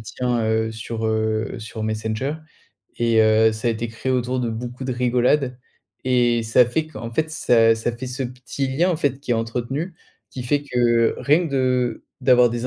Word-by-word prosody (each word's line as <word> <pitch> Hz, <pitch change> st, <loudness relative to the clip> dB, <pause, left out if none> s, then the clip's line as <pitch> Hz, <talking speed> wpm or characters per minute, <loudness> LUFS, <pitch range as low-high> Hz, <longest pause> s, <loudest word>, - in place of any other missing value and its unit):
tient 120 Hz, +2 st, -2 dB
heu 110 Hz, 0 st, +1 dB
sur, 110 Hz, 0 st, -5 dB
heu, 110 Hz, 0 st, -1 dB
sur 110 Hz, 0 st, -7 dB
Messenger. 110 Hz, +6 st, -2 dB, 0.6 s
Et 115 Hz, -1 st, +3 dB
heu, 110 Hz, 0 st, +5 dB
ça 110 Hz, +2 st, -5 dB
a -, -, +3 dB
été 115 Hz, +1 st, -4 dB
créé 115 Hz, +3 st, -3 dB
autour 125 Hz, 0 st, 0 dB
de 120 Hz, -, -1 dB
beaucoup 120 Hz, +3 st, -6 dB
de 130 Hz, -, -2 dB
rigolade 125 Hz, +2 st, +1 dB, 0.5 s
et 120 Hz, -2 st, +2 dB
ça 110 Hz, +3 st, +5 dB
fait 150 Hz, +7 st, -1 dB
qu'en 115 Hz, -6 st, -8 dB
fait 155 Hz, +5 st, 0 dB
ça 115 Hz, -8 st, +4 dB
ça 115 Hz, +2 st, -2 dB
fait 130 Hz, +2 st, -6 dB
ce 125 Hz, +2 st, -4 dB
petit 130 Hz, +2 st, -4 dB
lien 160 Hz, +8 st, +1 dB
en 170 Hz, -, 0 dB
fait, 140 Hz, -4 st, 0 dB
qui 130 Hz, -, -2 dB
est -, -, +3 dB
entretenu 125 Hz, +9 st, -3 dB, 0.4 s
qui 125 Hz, -, -6 dB
fait 145 Hz, +4 st, +1 dB
que 120 Hz, -4 st, +2 dB
rien 150 Hz, +6 st, +3 dB
que 140 Hz, -, -9 dB
de 125 Hz, -3 st, 0 dB, 0.2 s
d'avoir 125 Hz, -2 st, +5 dB
des 120 Hz, +1 st, -3 dB
120 Hz, 195 wpm, -22 LUFS, 115-130 Hz, 0.6 s, heu